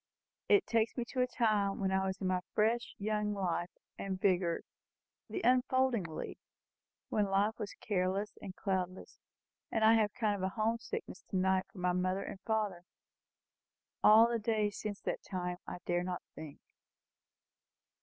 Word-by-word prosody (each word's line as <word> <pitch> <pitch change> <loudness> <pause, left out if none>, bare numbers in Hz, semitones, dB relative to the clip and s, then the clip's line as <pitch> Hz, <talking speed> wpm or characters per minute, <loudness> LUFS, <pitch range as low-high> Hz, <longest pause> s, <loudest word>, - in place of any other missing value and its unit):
It 405 -1 +6
takes 230 +1 +1
me 240 - -1
to 255 - 0
a 250 - +3
time 215 -5 +1
when 190 -1 0
I 190 0 +1
was 190 0 -2
in 195 - -3
my 185 0 +2 0.2
fresh 225 +3 +1
young 210 0 -1
life 180 -2 -1 0.3
and 190 -1 -3
vigour 180 -3 +2 0.7
the 380 - -3
unfolding 255 -3 +3
leaf 160 -1 -6 0.7
when 210 -1 +2
life 200 +3 +1
was 205 - -5
careless 195 +1 -1
and 190 -2 -7
cloudless; 185 -2 -3 0.5
and 225 - +1
I 220 +1 +7
have 220 -2 +4
a - - -19
kind 205 -4 +1
of 190 - 0
home 225 +1 +1
sickness 450 - -6
to - - -4
night 190 0 +2
for - - -16
my 180 0 +1
father 185 +2 0
and - - -7
mother. 215 -3 +1 1.3
Of 225 +2 +8
the 235 - +1
days 210 -2 0
since 205 -2 -4
that - - -2
time, 180 -2 -3
I - - -5
dare 175 0 +1
not 180 0 -4
think." 155 -2 -9
205 Hz, 165 wpm, -33 LUFS, 185-220 Hz, 1.3 s, Of